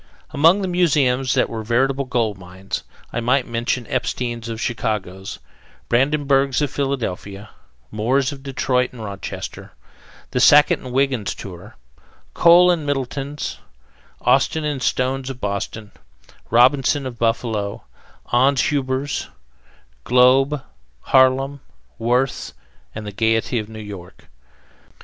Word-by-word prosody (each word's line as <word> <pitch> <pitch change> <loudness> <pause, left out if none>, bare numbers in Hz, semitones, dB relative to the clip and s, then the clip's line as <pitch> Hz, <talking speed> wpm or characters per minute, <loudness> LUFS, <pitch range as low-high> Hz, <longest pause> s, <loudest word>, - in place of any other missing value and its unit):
Among 165 +7 +4
the - - -1
museums 140 -8 +2
that - - +3
were 115 -1 -5
veritable 135 +5 +1
gold 115 -5 0
mines, 95 +2 -6 0.3
I 120 - -1
might 125 +2 +1
mention 120 +1 -2
Epstein's 120 +1 -3
of 115 -1 -5
Chicago; 105 -6 -3 0.7
Brandenberg's 135 +1 +2
of 145 -2 -1
Philadelphia; 110 -7 -4 0.4
Moore's 130 +6 +1
of 140 -1 -9
Detroit 130 -2 -1
and 115 -3 -9
Rochester; 100 -1 -7 0.6
The 125 - 0
Sackett 150 +3 +6
and 130 - -9
Wiggins 130 -5 0
Tour; 95 +3 -10 0.6
Kohl 175 +1 +6
and 170 -3 -1
Middleton's; 140 +1 -3 0.6
Austin 160 - +2
and 145 -3 -2
Stone's 130 +1 -1
of 130 -1 -7
Boston; 105 +1 -4 0.6
Robinson 130 +4 +3
of 120 -3 -7
Buffalo; 115 -3 -1 0.5
Ans 130 +2 +4
Huber's, 135 0 -1 0.8
Globe, 130 +3 +4 0.4
Harlem, 135 +1 +3 0.4
Worth's, 125 - 0 0.4
and 110 -1 -6
the 105 - -5
Gayety 115 +3 +1
of 105 0 -6
New 110 - -10
York. 100 -4 -10
125 Hz, 115 wpm, -21 LUFS, 110-140 Hz, 0.8 s, Sackett